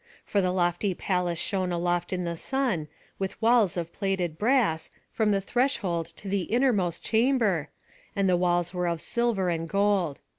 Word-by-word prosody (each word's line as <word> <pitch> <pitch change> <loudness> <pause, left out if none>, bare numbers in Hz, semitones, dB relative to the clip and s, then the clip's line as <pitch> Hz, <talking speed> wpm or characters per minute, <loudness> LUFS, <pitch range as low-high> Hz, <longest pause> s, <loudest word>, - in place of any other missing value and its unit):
For 200 - +1
the 185 - +1
lofty 180 +1 0
palace 180 -2 -1
shone 185 0 -1
aloft 175 0 -1
in 180 -1 -1
the 170 -1 -2
sun, 235 - -1 0.3
with 195 -1 -3
walls 225 -6 +3
of 170 -1 -4
plated 190 -5 -1
brass, 210 -6 +1 0.2
from 220 -2 +1
the 200 -1 +2
threshold 195 - 0
to 200 - -7
the 195 -2 0
innermost 210 -9 +1
chamber, 220 - +2 0.5
and 200 -1 +2
the 180 - +4
doors 175 0 +1
were 180 -1 -1
of 170 -1 -1
silver 225 -4 0
and 165 0 -3
gold. 195 -7 +1
185 Hz, 170 wpm, -27 LUFS, 175-210 Hz, 0.5 s, the